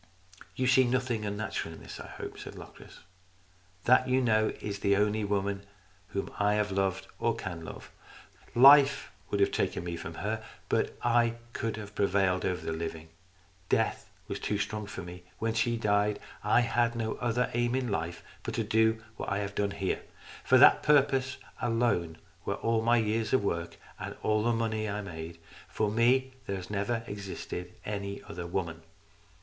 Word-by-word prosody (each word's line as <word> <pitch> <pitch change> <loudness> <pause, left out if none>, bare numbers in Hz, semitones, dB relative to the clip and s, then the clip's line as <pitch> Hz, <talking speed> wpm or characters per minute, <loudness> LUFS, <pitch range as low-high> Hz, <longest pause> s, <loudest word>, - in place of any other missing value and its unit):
"You 130 - 0
see 130 +1 +5
nothing 120 -3 0
unnatural 100 -5 -3
in - - -13
this, - - -9
I - - -8
hope," - - -8
said - - -8
Locris. - - -12 0.4
" 90 0 -32
That, 130 +1 +5
you 130 +1 +4
know, 110 -3 +3
is 100 -1 -4
the 100 0 +3
only 105 +1 +2
woman 100 -1 -1 0.4
whom 100 - -4
I 105 +1 +3
have 105 -1 0
loved 95 -1 0
or 115 -1 +1
can 85 -7 -6
love. - - -9 0.6
Life 140 +2 +7 0.2
would 100 - 0
have 100 - +4
taken - - -1
me 85 -1 -3
from 85 0 -7
her, 110 +4 -3 0.3
but - - 0
I 120 -1 +3 0.2
could 115 -1 -2
have 105 -1 -8
prevailed 95 -2 +2
over 90 -1 -2
the - - -1
living. 80 0 -5 0.6
Death - - +1 0.2
was - - -4
too 105 - -1
strong 105 +1 -3
for 95 -3 -6
me. 90 +1 -9 0.2
When 115 0 -1
she 115 +1 +1
died 105 -1 +2 0.2
I 120 - +4
had 120 0 +1
no 110 -1 -1
other 120 +1 0
aim 120 +1 +1
in 130 -2 -1
life 85 -4 -3 0.2
but - - -4
to - - 0
do 110 0 +2
what - - -4
I 100 - 0
have 100 0 -3
done 100 0 0
here. 95 -2 -2 0.4
For - - +5
that - - +8
purpose 135 -3 +3 0.2
alone 115 -9 +1 0.3
were - - -1
all 115 -1 +1
my 120 +1 +4
years 110 +1 0
of 130 - +4
work, 85 -3 -2 0.2
and - - -5
all 110 0 +2
the 120 - +3
money 110 -1 0
that 100 - -2
I 105 - -2
made. 85 -3 -7 0.3
For 105 -1 0
me 125 +4 +3 0.2
there 100 - -1
has 95 +1 -7
never 105 +3 -1
existed 95 -3 -6
any 100 -1 -4
other 85 0 -6
woman." 85 -2 -3
105 Hz, 185 wpm, -30 LUFS, 95-115 Hz, 0.6 s, that